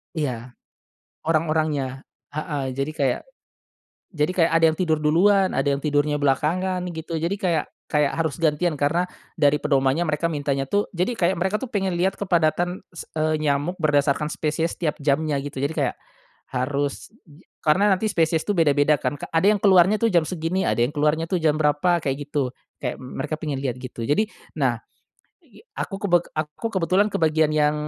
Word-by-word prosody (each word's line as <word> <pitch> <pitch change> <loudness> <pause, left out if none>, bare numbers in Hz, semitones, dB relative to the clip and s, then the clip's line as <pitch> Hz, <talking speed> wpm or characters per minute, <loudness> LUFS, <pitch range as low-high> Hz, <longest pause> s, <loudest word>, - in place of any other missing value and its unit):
Iya. 125 -5 -3 0.7
Orang-orangnya. 155 -4 0 0.2
Heeh, 150 -2 -3
jadi 140 +3 -1
kayak - - 0 0.9
jadi 150 -1 -1
kayak 170 -2 +3
ada 165 - +5
yang 155 - -7
tidur 160 -4 +2
duluan, 190 +5 +4
ada 135 +2 0
yang 140 - -6
tidurnya 145 0 +1
belakangan 155 +7 +1 0.2
gitu 160 0 -4
jadi 170 +5 -1
kayak 175 -6 0 0.3
kayak 150 -2 +2
harus 160 0 -1
gantian 160 +1 +1
karena 160 +5 +2 0.3
dari 150 -2 +3
pedomannya 140 +3 +1
mereka 155 +2 0
mintanya 140 -2 -1
tuh 205 +9 0
jadi 180 +7 0
kayak 190 -5 +1
mereka 190 +4 0
tuh 265 - -5
pengen 195 -5 -1
lihat 190 +2 +1
kepadatan 175 -1 +1 0.2
s - - -6
eee, 155 0 +1
nyamuk 145 +4 0
berdasarkan 150 -1 +1
spesies 160 +2 -2
tiap 155 -4 0
jamnya 150 +1 +1
gitu 140 -2 -6
jadi 140 +3 -1
kayak, - - 0 0.6
harus 140 +5 -2 0.5
karena 190 +7 +3
nanti 190 +3 +1
spesies 165 -5 +1
tuh 205 - +1
beda-beda 150 -2 +4
kan, 145 0 -3
k - - -6
ada 165 - +3
yang 210 - +1
keluarnya 190 +1 +5
tuh 230 - +3
jam 175 -7 +3
segini, 170 +3 -2
ada 105 +1 0
yang 125 +6 +1
keluarnya 150 +2 +1
tuh 185 - 0
jam 155 -1 +2
berapa, 155 +4 +2
kayak 135 -4 -1 0.2
gitu. 130 -3 -1 0.2
Kayak 125 -3 -3
mereka 135 +4 -4
pengen 150 -3 -4
lihat 130 -3 -2
gitu. 120 -3 -6
Jadi, 215 +9 +1 0.2
nah - - +1 0.7
igi - - -19 0.2
aku 195 - -3
kebe 175 -4 +4 0.2
aku 155 +7 -3
kebetulan 190 +1 +2
ke - - -1
bagian 155 -1 +2
yang, 150 -1 +2
155 Hz, 175 wpm, -23 LUFS, 145-175 Hz, 0.9 s, ada